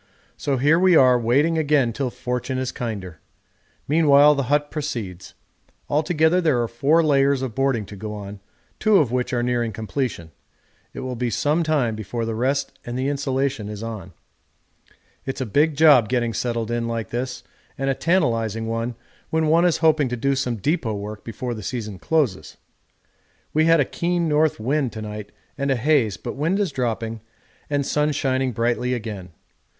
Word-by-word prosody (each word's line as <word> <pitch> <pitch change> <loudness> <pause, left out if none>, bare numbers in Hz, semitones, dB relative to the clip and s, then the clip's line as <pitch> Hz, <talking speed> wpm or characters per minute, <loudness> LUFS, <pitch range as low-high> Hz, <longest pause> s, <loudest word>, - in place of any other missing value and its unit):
So 140 -2 -1
here 150 +6 +4
we 185 -1 +5
are 125 -4 +6
waiting 145 +8 +2
again 145 -6 +2
till 135 +1 -2
fortune 125 +2 -3
is 130 -1 -2
kinder. 100 -9 -5 0.7
Meanwhile 150 -1 +6
the 140 -3 -2
hut 145 0 +1
proceeds; 110 - -5 0.6
altogether 160 +3 +2
there 155 -8 +2
are - - -2
four 145 +8 +2
layers 140 -2 +3
of 125 -4 -4
boarding 135 -5 0
to 100 - -10
go 105 +2 -6
on, 100 -1 -8 0.4
two 215 -2 +4
of 140 -10 +2
which 125 +1 -1
are 120 -2 0
nearing 120 -2 0
completion; 110 - -4 0.6
it - - -7
will 130 -1 -4
be 120 0 -1
some 150 +7 +1
time 145 -8 +1
before 110 +2 -4
the 115 - -2
rest 135 +5 -1
and 120 +1 -5
the 130 +2 0
insulation 135 -5 -1
is 105 +1 -6
on. 105 -6 -7 1.1
It's 135 - -3
a 130 - -1
big 145 +7 +2
job 145 -8 +6
getting 120 -2 0
settled 115 -1 -2
in 120 0 -1
like 115 -3 -4
this 125 +1 -4 0.3
and 135 - -2
a 135 - +2
tantalising 115 - 0
one 115 +1 -3 0.3
when 160 0 +1
one 165 +2 +4
is 175 -3 +1
hoping 155 -4 +4
to 125 - -3
do 140 +4 +1
some 125 -3 -1
depot 130 - -1
work 105 +1 -7
before 120 +2 -5
the 110 - -7
season 105 -3 -5
closes. 140 - -1 1.0
We 155 +1 +3
had 165 0 +5
a 140 - +3
keen 170 +2 -1
north 155 -2 +2
wind 135 +2 0
to 110 - -6
night 105 -1 -7 0.3
and 140 0 0
a 135 - +3
haze, 120 - +2
but - - -6
wind 160 +8 0
is 195 -6 0
dropping 115 -4 -3 0.5
and 145 -1 0
sun 150 +2 +1
shining 130 -2 0
brightly 120 +2 0
again. 105 -6 -6
130 Hz, 180 wpm, -22 LUFS, 115-150 Hz, 1.1 s, are